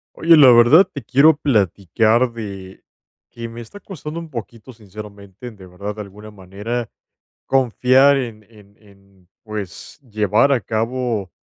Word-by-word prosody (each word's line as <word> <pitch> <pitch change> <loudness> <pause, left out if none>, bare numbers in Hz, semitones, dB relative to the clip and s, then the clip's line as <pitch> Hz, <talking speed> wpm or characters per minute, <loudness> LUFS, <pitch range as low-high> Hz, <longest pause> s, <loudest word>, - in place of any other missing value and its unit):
Oye, 165 0 +4
la 135 -4 +8
verdad, 120 +10 +6
te 145 -6 -9
quiero 140 +7 +4
platicar 110 - +1
de 100 -4 -9 0.5
que 115 0 -8
me 115 +1 -10
está 120 - -13
costando 165 -5 -8
un 165 -1 -10
poquito 115 -1 -9
sinceramente, 105 0 -12
de 100 -5 -15
verdad, 100 +3 -8
de 105 - -7
alguna 105 +1 -12
manera 105 +4 -6 0.6
confiar 130 +2 +3
en 115 -5 -6
en 105 -2 -20
en, 100 -3 -24 0.2
pues, 105 -6 -8
llevar 110 +5 +1
a 125 - 0
cabo 115 -3 -3
110 Hz, 140 wpm, -19 LUFS, 100-130 Hz, 0.6 s, la